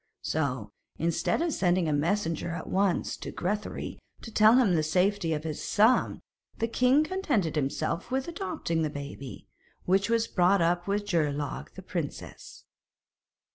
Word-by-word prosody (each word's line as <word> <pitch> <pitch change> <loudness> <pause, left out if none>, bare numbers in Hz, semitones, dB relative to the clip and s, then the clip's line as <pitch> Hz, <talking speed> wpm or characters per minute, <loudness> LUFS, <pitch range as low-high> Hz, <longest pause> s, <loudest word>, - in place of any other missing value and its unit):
So, 130 -8 -2 0.3
instead 170 - 0
of 340 -3 0
sending 180 -2 +2
a 155 - +1
messenger 165 +2 0
at 170 - -6
once 190 -1 0
to - - -7
Grethari 205 +4 -3 0.2
to 225 - -8
tell 215 +1 +6
him 255 -5 +5
of - - +3
the 160 - +3
safety 180 +3 +1
of 155 -1 -1
his 155 -2 -4
son, 220 +5 +3 0.4
the 230 - 0
king 255 +5 +3
contented 290 - -1
himself 150 - -1
with 260 +1 -1
adopting 320 - -2
the 155 - 0
baby, 140 -3 -8 0.4
which 195 +3 +2
was 230 -1 +2
brought 185 +2 +3
up 175 +1 +1
with 205 +1 0
Geirlaug 145 - -2
the - - -9
princess. - - -6
180 Hz, 155 wpm, -28 LUFS, 155-220 Hz, 0.4 s, tell